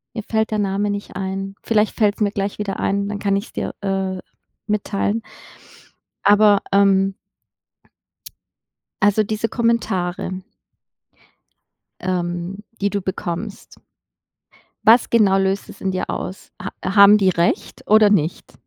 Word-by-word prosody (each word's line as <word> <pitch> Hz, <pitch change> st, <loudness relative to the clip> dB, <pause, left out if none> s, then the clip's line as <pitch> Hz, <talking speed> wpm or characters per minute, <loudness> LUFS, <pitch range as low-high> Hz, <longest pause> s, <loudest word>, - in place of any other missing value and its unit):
mir 220 Hz, -, -4 dB
fällt 220 Hz, +1 st, -1 dB
der 215 Hz, -, 0 dB
Name 200 Hz, +1 st, 0 dB
nicht 205 Hz, 0 st, -5 dB
ein. 195 Hz, 0 st, -4 dB
Vielleicht 215 Hz, -1 st, +1 dB
fällt's 210 Hz, -1 st, +1 dB
mir 205 Hz, -1 st, +2 dB
gleich 200 Hz, 0 st, -3 dB
wieder 200 Hz, -2 st, -3 dB
ein, 200 Hz, 0 st, 0 dB
dann 205 Hz, 0 st, -4 dB
kann 200 Hz, -1 st, +1 dB
ich's 200 Hz, +3 st, -4 dB
dir, -, -, -3 dB
äh, 195 Hz, -1 st, -2 dB, 0.5 s
mitteilen. 210 Hz, +1 st, -1 dB, 1.0 s
Aber, 205 Hz, 0 st, +5 dB
ähm 195 Hz, -1 st, +3 dB, 1.9 s
also, 205 Hz, +1 st, +4 dB
diese 215 Hz, +2 st, -2 dB
Kommentare 190 Hz, -6 st, -1 dB, 1.6 s
ähm, 175 Hz, +1 st, -3 dB, 0.2 s
die 200 Hz, -, +2 dB
du 200 Hz, 0 st, -2 dB
bekommst 190 Hz, +2 st, -5 dB, 1.1 s
was 230 Hz, +2 st, +6 dB
genau 205 Hz, -4 st, +4 dB
löst 195 Hz, 0 st, -1 dB
das -, -, -13 dB
in 190 Hz, -, -1 dB
dir 185 Hz, 0 st, -3 dB
aus? 190 Hz, -, -6 dB
Ha -, -, -5 dB, 0.2 s
haben 200 Hz, 0 st, +8 dB
die 195 Hz, -2 st, +3 dB
recht 170 Hz, -1 st, -1 dB
oder 215 Hz, 0 st, +6 dB
nicht? 170 Hz, -5 st, 0 dB
200 Hz, 130 wpm, -20 LUFS, 190-210 Hz, 1.9 s, haben